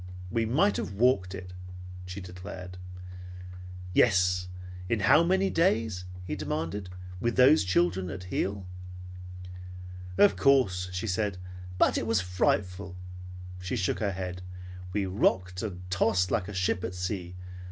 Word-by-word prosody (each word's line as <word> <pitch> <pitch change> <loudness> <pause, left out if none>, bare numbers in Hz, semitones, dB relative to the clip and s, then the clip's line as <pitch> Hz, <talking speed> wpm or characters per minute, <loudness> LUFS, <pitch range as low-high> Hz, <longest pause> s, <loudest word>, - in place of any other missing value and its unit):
"We 115 -1 +1
might 170 - +3
have - - -4
walked 100 -4 +2
it," 90 -1 -8 0.5
she 90 +2 -6
declared. 90 0 -8 1.1
"Yes. 90 -4 +3 0.4
In 115 -3 +1
how 155 - +6
many 190 +3 +2
days," 115 - +1 0.2
he 90 - -4
demanded, 85 +5 -3 0.3
"with 120 +4 0
those 130 -1 +6
children 90 0 +1
at 95 -1 -6
heel?" 95 +1 -2 1.5
"Of 100 -1 +6
course," 95 -5 +3
she 90 +4 -3
said, 105 -1 -1 0.4
"but - - +3
it 115 - -4
was 115 -3 +3
frightful." 90 0 -1 0.6
She 90 0 -3
shook 90 0 0
her 100 -2 0
head. 90 -1 -5 0.5
"We 100 +1 0
rocked 95 -1 +1
and 90 -4 -6
tossed 90 0 +2
like 100 -5 0
a 105 - -6
ship 95 -1 0
at 90 - -4
sea. 90 -1 -4
95 Hz, 135 wpm, -28 LUFS, 90-110 Hz, 1.5 s, how